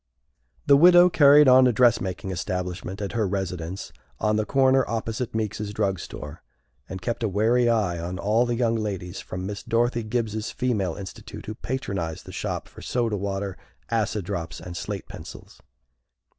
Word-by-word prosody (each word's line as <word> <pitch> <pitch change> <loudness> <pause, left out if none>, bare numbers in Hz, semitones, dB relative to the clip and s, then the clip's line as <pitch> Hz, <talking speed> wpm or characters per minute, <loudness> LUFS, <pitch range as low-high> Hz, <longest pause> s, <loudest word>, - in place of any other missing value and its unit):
The 140 - +7
widow 175 +3 +7
carried 145 -2 +7
on 130 0 +7
a - - +4
dress 120 0 +4
making 95 0 -4
establishment 90 +2 -4
at 100 - -3
her 110 -3 0
residence 95 -2 -4 0.3
on 105 0 +1
the 110 0 0
corner 135 -1 +4
opposite 115 +1 -3
Meeks's 105 -1 -2
drug 100 -3 0
store, 75 -1 -8 0.5
and 95 -1 -7
kept 120 +4 -2
a 110 - 0
wary 115 +5 +3
eye 100 -7 +1
on 90 +2 -4
all 110 +5 +2
the 120 - 0
young 115 -1 +1
ladies 95 -4 -4
from 90 0 -6
Miss 100 +1 -5
Dorothy 120 +1 +1
Gibbs's 110 -1 -2
Female 105 -9 -1
Institute 95 -3 -9
who 110 - -5
patronized 100 -10 -4
the - - -9
shop - - -4
for - - -13
soda 115 -3 -1
water, 100 -1 -3 0.3
acid 105 -3 0
drops, 85 -2 -4
and 90 -1 -8
slate - - -5
pencils. - - -11
105 Hz, 170 wpm, -25 LUFS, 95-120 Hz, 0.5 s, The